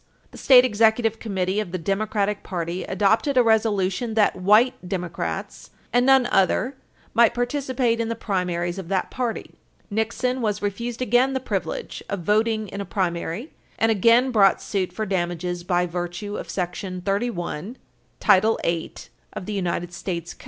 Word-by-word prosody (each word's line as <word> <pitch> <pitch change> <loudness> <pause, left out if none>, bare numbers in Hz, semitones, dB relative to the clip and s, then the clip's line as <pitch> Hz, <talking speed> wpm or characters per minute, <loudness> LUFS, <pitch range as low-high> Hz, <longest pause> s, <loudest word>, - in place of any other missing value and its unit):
The - - -12
State 255 -2 +7
Executive 225 0 +2
Committee 190 -2 -1
of 210 -5 -4
the 185 - -2
Democratic 205 +3 -1
party 175 0 -4
adopted 215 - +1
a 250 - +7
resolution 220 -1 +1
that 215 -2 +3
white 210 +7 +4 0.2
Democrats 180 -3 -4 0.2
and 245 +1 +3
none 265 -2 +6
other 210 +8 +2 0.4
might 235 0 +4
participate 245 -1 0
in 230 0 -1
the 230 - -2
primaries 180 -4 -2
of 185 - -7
that 190 0 -1
party. 245 -3 -3 0.4
Nixon 230 +4 -1
was 210 -2 0
refused 235 +5 -3
again 250 +3 +3
the 265 - 0
privilege 195 -9 -4
of 200 -2 -3
voting 215 +3 +1
in 200 - -5
a - - -2
primary, 180 - -3 0.3
and 225 0 +3
again 230 +5 +4
brought 200 -5 +4
suit 190 -3 -2
for 215 +4 -3
damages 175 -2 -2
by 180 0 +1
virtue 175 +4 -4
of - - -6
§ 180 0 -4
31, 200 - -2 0.4
Title 215 +4 +4
8 170 -1 -3 0.4
U.S. 175 -3 -3
205 Hz, 145 wpm, -23 LUFS, 180-230 Hz, 0.4 s, State